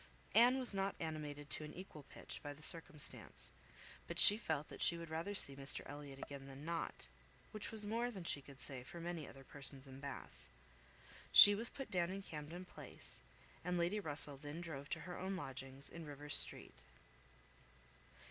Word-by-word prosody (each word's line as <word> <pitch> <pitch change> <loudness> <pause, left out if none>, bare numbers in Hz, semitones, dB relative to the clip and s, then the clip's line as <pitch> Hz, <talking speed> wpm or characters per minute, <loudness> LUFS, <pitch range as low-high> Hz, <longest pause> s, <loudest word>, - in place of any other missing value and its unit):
Anne 245 +4 +7
was 255 -5 -2
not 195 0 0
animated 150 -2 -4
to 155 - 0
an 150 - -8
equal 180 -4 -8
pitch - - -6
by 145 -1 -5
the 150 +1 -12
circumstance, 165 -2 -3 0.6
but - - -5
she 205 - +13
felt 160 -9 -2
that - - -9
she 170 - +7
would 170 -1 -7
rather 165 +6 -2
see 140 -7 +1
Mr 135 0 -2
Elliot 145 -1 -8
again 135 0 -7
than 135 +2 -9
not, 170 0 -3 0.5
which 215 -2 -3
was 215 -2 -1
more 230 +3 0
than 195 -7 -6
she 150 -4 0
could 140 0 -13
say 135 -3 -2
for 150 +7 -9
many 170 -3 -4
other 135 - -11
persons 135 0 -2
in 135 0 -10
Bath. 140 0 -8 0.8
She 205 - +11
was 225 +3 0
put 270 -6 -7
down 175 -3 +2
in 195 +1 -4
Camden 160 +2 -6
Place; - - -6 0.4
and 180 0 0
Lady 175 +5 +1
Russell 145 -5 -2
then 145 +3 -6
drove 145 -5 -6
to 165 - -2
her 175 +3 -6
own 190 +1 -2
lodgings, 135 -3 -5
in 170 - -6
Rivers 145 0 -2
Street. - - -2
160 Hz, 185 wpm, -40 LUFS, 140-185 Hz, 0.8 s, she